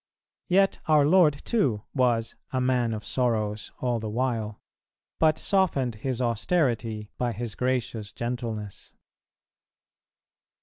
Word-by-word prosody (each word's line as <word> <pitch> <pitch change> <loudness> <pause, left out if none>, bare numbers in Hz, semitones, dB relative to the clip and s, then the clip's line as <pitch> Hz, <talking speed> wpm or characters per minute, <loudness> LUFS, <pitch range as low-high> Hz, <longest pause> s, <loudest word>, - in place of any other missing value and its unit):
Yet 195 +2 +3
our 150 -2 +5
Lord 155 -3 +4
too 130 - +1
was 120 -4 +1 0.2
"a 130 - 0
man 125 -2 +1
of 110 -1 -5
sorrows" 110 -4 -1
all 120 -2 0
the 110 -1 -4
while, 115 -2 -2 0.6
but 155 -1 +4
softened 170 - +1
His 130 -3 -2
austerity 115 -3 0
by 120 -2 0
His 115 -2 -4
gracious 120 -4 -2
gentleness. 115 -4 -5
120 Hz, 115 wpm, -27 LUFS, 110-135 Hz, 0.6 s, our